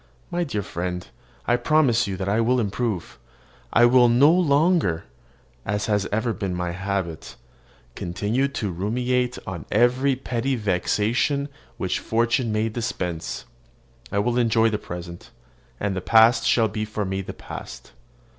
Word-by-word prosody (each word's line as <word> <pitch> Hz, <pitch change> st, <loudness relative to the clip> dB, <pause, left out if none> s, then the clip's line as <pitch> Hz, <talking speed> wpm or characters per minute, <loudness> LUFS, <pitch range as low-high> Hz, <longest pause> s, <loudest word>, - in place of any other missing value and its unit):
My 175 Hz, 0 st, 0 dB
dear 105 Hz, -11 st, -3 dB
friend 90 Hz, 0 st, -4 dB, 0.4 s
I 120 Hz, -, +3 dB
promise 125 Hz, -4 st, +3 dB
you 95 Hz, -1 st, -3 dB
I 100 Hz, +4 st, +1 dB
will 125 Hz, +2 st, +2 dB
improve; 105 Hz, -3 st, -2 dB, 0.5 s
I 120 Hz, -, +6 dB
will 120 Hz, 0 st, +6 dB
no 135 Hz, +6 st, +6 dB
longer, 160 Hz, -, +2 dB, 0.6 s
as 105 Hz, 0 st, -1 dB
has 105 Hz, -3 st, 0 dB
ever 110 Hz, +2 st, 0 dB
been 95 Hz, -3 st, -3 dB
my 90 Hz, -1 st, -2 dB
habit, 95 Hz, -3 st, -4 dB, 0.6 s
continue 105 Hz, +10 st, -1 dB
to 110 Hz, -8 st, -3 dB
ruminate 125 Hz, +7 st, -1 dB
on 90 Hz, -4 st, -6 dB
every 125 Hz, +4 st, +3 dB
petty 130 Hz, 0 st, -2 dB
vexation 110 Hz, -, 0 dB, 0.3 s
which -, -, -1 dB
fortune 115 Hz, +1 st, 0 dB
may 110 Hz, +1 st, +1 dB
dispense; 90 Hz, -7 st, -4 dB, 0.7 s
I -, -, -1 dB
will 120 Hz, +4 st, +1 dB
enjoy 115 Hz, -1 st, +3 dB
the 105 Hz, -, -1 dB
present, 85 Hz, -2 st, -8 dB, 0.5 s
and 100 Hz, -2 st, -1 dB
the 95 Hz, -, -2 dB
past 115 Hz, +4 st, +5 dB
shall 115 Hz, -2 st, +4 dB
be 105 Hz, +1 st, -3 dB
for 110 Hz, -1 st, -3 dB
me 95 Hz, 0 st, -2 dB
the -, -, -7 dB
past. -, -, -9 dB
110 Hz, 145 wpm, -24 LUFS, 95-125 Hz, 0.7 s, I